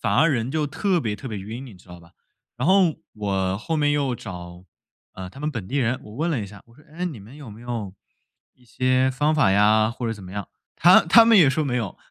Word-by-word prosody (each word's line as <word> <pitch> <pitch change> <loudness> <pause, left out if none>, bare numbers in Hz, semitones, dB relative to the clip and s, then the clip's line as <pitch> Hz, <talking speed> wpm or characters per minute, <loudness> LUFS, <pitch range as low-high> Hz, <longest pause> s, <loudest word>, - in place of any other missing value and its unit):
反 100 -2 0
而 160 +5 +4
人 120 0 -2
就 155 0 -1
特 180 +5 0
别 105 -6 -3
特 135 - -8
别 105 -3 -5
晕， 110 +7 -7
你 115 -7 -12
知 90 0 -20
道 90 0 -12
吧？ 85 0 -20 0.4
然 125 - -2
后 185 -4 +4 0.2
我 95 -2 -1
后 160 +9 -3
面 145 -1 +2
又 140 -4 0
找， 90 -2 -10 0.5
呃， 95 -1 -8
他 135 - -14
们 150 +1 -3
本 115 -9 -6
地 140 - -3
人， 125 -1 0
我 105 - -12
问 165 +4 -1
了 140 -9 -1
一 100 - -5
下， 100 0 -13
我 115 - -22
说： 150 - -21
“哎， 175 +3 -4
你 145 - -5
们 115 +8 -14
有 145 -6 -11
没 105 +2 -12
有 115 -6 -5 0.6
一 125 - -26
些 130 +2 +1
方 145 +4 +1
法 145 -11 +3
呀， 110 +2 +4
或 120 0 -5
者 - - -1
怎 100 -4 -11
么 90 - -10
样？ 100 -1 -6 0.3
他 180 +2 +6
他 225 +7 +6
们 225 -3 +6
也 150 -6 +6
说 155 +3 0
没 125 -3 -1
有， 110 -7 -4
120 Hz, 275 characters per minute, -23 LUFS, 100-150 Hz, 0.6 s, 他